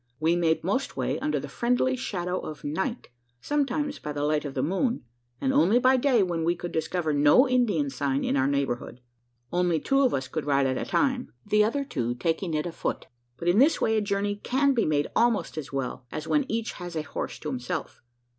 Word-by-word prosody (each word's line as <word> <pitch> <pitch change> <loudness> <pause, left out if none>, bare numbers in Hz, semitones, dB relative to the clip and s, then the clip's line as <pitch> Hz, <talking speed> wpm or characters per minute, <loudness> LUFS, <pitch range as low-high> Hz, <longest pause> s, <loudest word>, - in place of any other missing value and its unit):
We 160 +2 +2
made 165 -2 +1
most 230 +10 -1
way - - -1
under 305 - 0
the - - -6
friendly 250 +2 +1
shadow 185 -7 -3
of 155 - -8
night 190 - -3 0.3
sometimes 290 - -1
by 150 - -5
the 145 0 -2
light 150 0 +1
of 140 - -5
the 130 - 0
moon 195 - 0 0.4
and 265 - 0
only 255 -5 +4
by 255 +1 +4
day, 250 -5 +3
when 170 -3 -1
we 170 +2 +2
could 175 0 -6
discover 160 0 -1
no 145 - +5
Indian 210 - +1
sign 135 0 -1
in - - 0
our 135 -1 +2
neighbourhood. 140 -3 -2 0.5
Only 175 -2 +2
two 275 - +2
of 260 -3 +3
us 130 0 -3
could 155 0 -4
ride 140 -1 +3
at 130 -1 +1
a - - -5
time 265 -3 +1
the 210 0 +4
other 275 +6 0
two 120 - -2
taking 165 +5 -1
it 150 - -1
afoot; 170 - -3 0.3
but 170 - -5
in 175 +5 +4
this 290 +5 +5
way 220 - +2
a 215 - +2
journey 200 0 -1
can 275 +6 +2
be 235 - +1
made 145 -1 +2
almost 235 -2 +2
as 155 -3 -6
well, 130 -2 -4
as 155 0 -5
when 290 -3 +1
each 225 0 -1
has 175 -2 -8
a 155 - -1
horse - - -5
to 150 - -5
himself. 125 -3 -4
175 Hz, 215 wpm, -27 LUFS, 150-245 Hz, 0.5 s, no